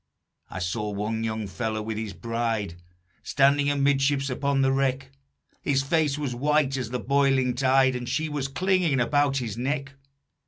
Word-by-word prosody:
"I - - -7
saw 105 +4 -2
one 105 +2 -3
young 110 -1 -2
fellow 110 +3 -3
with 110 0 -4
his 110 -2 -4
bride, 110 -3 -3 0.4
Standing 140 +1 +3
amidships 140 -1 +1
upon 140 +1 0
the 135 - +3
wreck; 135 0 0 0.5
His 135 -2 +1
face 150 0 +1
was 145 -4 -3
white 145 +2 +1
as 125 -4 -3
the 125 +1 -3
boiling 135 -2 +2
tide, 130 0 +3
And 125 0 -4
she 160 +5 -1
was 145 -3 -3
clinging 175 -1 +1
about 140 +2 +2
his 115 -4 -4
neck. 135 +1 -2
135 Hz, 160 wpm, -26 LUFS, 115-140 Hz, 0.5 s, Standing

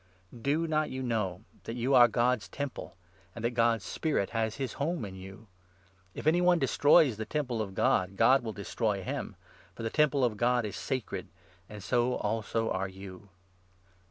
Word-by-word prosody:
Do 150 +6 +1
not 155 -1 0
you 130 0 -4
know 105 -7 -2 0.2
that 115 - -5
you 125 +3 0
are 120 -2 +8
God's 120 0 +1
Temple, 140 -9 -6 0.4
and 115 - -5
that 120 - +1
God's 115 -3 +2
16 90 - -7
Spirit 150 -11 0
has 115 -2 -1
his 135 -4 -4
home 160 -3 -1
in 95 - -8
you? 95 +3 -11 0.7
If - - -7
any 165 +3 +4
one 180 0 +4
destroys 145 -3 +4
the 110 - -4
Temple 130 -5 -2
17 110 -2 -2
of 95 - -14
God, 95 +1 +1
God 135 +6 +5
will 115 -2 -4
destroy 100 -1 -2
him; - - -4 0.4
for - - -7
the 115 - -2
Temple 145 -4 +3
of 110 -3 -2
God 120 0 +2
is 105 - -5
sacred, 130 -4 -4 0.4
and 105 -2 -9
so 120 +4 +1
also 110 +1 -1
are 95 +1 -1
you. 95 0 -11
120 Hz, 185 wpm, -30 LUFS, 105-135 Hz, 0.7 s, are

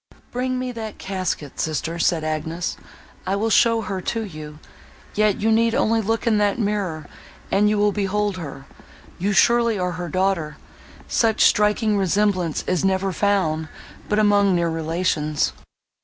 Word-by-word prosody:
"Bring 255 +1 -1
me 255 0 -3
that 220 -3 -7
casket, 185 -7 -4
sister," 160 +2 -2
said 165 -1 +1
Agnes; 160 +2 -3 0.5
"I 195 - +1
will 220 +3 0
show 230 -1 +4
her 195 -3 -4
to 225 +4 -2
you; 155 -5 -9 0.6
yet 215 -1 +2
you 225 +1 +2
need 230 +1 +3
only 225 +1 +2
look 225 +2 -1
in 220 -3 +3
that 205 -1 +1
mirror, 200 -8 -2 0.5
and 210 +2 +3
you 210 - +1
will 205 0 +3
behold 205 0 -1
her; 140 -5 -8 0.5
you 195 +4 0
surely 235 +2 +3
are 180 -1 -1
her 175 0 -5
daughter: 185 -3 0 0.5
such 225 -2 +1
striking 210 0 +3
resemblance 190 -3 +1
is 180 -1 0
never 190 0 +1
found 175 -5 0 0.4
but 210 - +1
among 205 -2 +4
near 170 -1 +1
relations." 160 -2 -1
195 Hz, 155 wpm, -22 LUFS, 170-215 Hz, 0.6 s, show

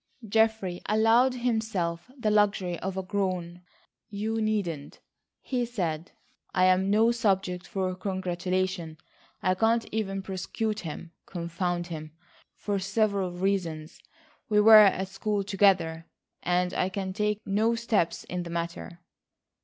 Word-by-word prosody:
Geoffrey 220 -4 +1
allowed 225 +4 +4
himself 220 -8 -1
the 220 -4 0
luxury 200 -4 +2
of 190 0 -4
a 190 - -2
groan. 185 -3 -2 0.5
"You 220 +2 -2
needn't," 195 -9 -2 0.4
he 250 -2 -1
said; 175 -9 -3 0.4
"I 185 0 +4
am 185 +1 +3
no 220 +3 +4
subject 195 -6 0
for 185 -1 -2
congratulation. 185 -2 -2 0.5
I 185 - +3
can't 225 +4 +2
even 195 -3 -2
prosecute 210 +3 -3
him, 165 0 -7 0.2
confound 175 0 -2
him, 155 -3 -7 0.4
for 205 -1 -2
several 195 -1 0
reasons. 175 -4 -2 0.5
We 210 -1 +4
were 220 +1 +9
at 195 -2 +5
school 200 +1 -2
together, 190 -5 +2 0.3
and 180 +1 +1
I 185 - 0
can 190 -1 -4
take 210 +1 0
no 215 +4 +2
steps 225 -7 0
in 180 0 -4
the 175 - -7
matter." 170 +1 -5
190 Hz, 130 wpm, -28 LUFS, 175-215 Hz, 0.5 s, were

